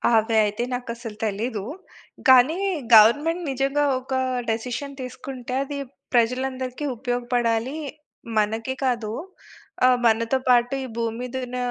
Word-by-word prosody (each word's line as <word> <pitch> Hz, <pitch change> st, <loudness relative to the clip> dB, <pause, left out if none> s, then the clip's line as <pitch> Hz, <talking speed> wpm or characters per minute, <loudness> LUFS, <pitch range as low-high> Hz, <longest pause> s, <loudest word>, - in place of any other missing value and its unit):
అవి 225 Hz, +1 st, +2 dB
అయితే 210 Hz, +3 st, -2 dB
నాకసలు 235 Hz, -3 st, -5 dB
తెలీదు. 215 Hz, 0 st, -2 dB, 0.7 s
కానీ 260 Hz, +7 st, +6 dB, 0.4 s
గవర్నమెంట్ 290 Hz, +11 st, +5 dB
నిజంగా 275 Hz, +2 st, +1 dB
ఒక 260 Hz, +1 st, -7 dB, 0.4 s
డిసిషన్ 250 Hz, +5 st, -3 dB
తీసుకుంటే, 255 Hz, 0 st, -7 dB
అది 280 Hz, +1 st, -6 dB, 0.4 s
ప్రజలందరికి 255 Hz, +3 st, 0 dB
ఉపయోగపడాలీ, 245 Hz, +1 st, -1 dB, 0.6 s
మనకే 225 Hz, +5 st, 0 dB
కాదూ, 230 Hz, -4 st, -1 dB, 0.7 s
ఆహ్, 250 Hz, -1 st, +5 dB
మనతో 230 Hz, +3 st, +2 dB
పాటు 245 Hz, +1 st, +4 dB
ఈ -, -, -4 dB
భూమి 230 Hz, -1 st, -1 dB
మీద 250 Hz, +1 st, -6 dB
ఉన్న 250 Hz, +1 st, -5 dB
245 Hz, 115 wpm, -24 LUFS, 230-260 Hz, 0.7 s, కానీ